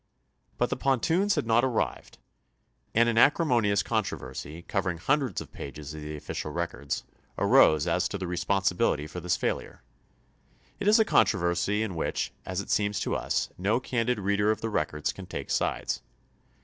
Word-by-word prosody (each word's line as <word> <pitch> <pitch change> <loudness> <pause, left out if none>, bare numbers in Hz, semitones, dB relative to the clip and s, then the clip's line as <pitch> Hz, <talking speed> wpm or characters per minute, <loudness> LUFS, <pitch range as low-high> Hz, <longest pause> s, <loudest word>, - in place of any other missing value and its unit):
But - - 0
the - - 0
pontoons 165 - +2
had - - 0
not 115 +1 +3
arrived, 125 -4 -2 0.8
and 115 +1 +5
an 115 -1 +3
acrimonious 120 - +4
con 110 -2 +1
troversy, 85 -3 -7
covering 95 -3 -1
hundreds 135 - 0
of - - -11
pages 70 +2 -8
of 80 - -7
the 75 +1 -6
official 75 0 -5
records, 70 -1 -3 0.3
arose 75 -2 +5
as 90 +3 +1
to 100 - -4
the 95 - -4
responsibility 90 -3 +1
for 80 +4 -7
this 90 0 0
failure. - - -3 1.0
It 200 - -2
is 215 +2 +7
a 220 - +5
controversy 95 - +2
in 105 -4 -3
which, 80 - -2
as 95 +1 -2
it - - -7
seems 105 -1 +1
to - - -1
us, - - -1
no 105 +6 +2
candid 125 -1 0
reader 100 +1 +1
of 110 0 0
the 115 - -2
records 75 -4 -1
can - - -10
take - - -5
sides. - - -1
100 Hz, 170 wpm, -28 LUFS, 85-115 Hz, 1.0 s, is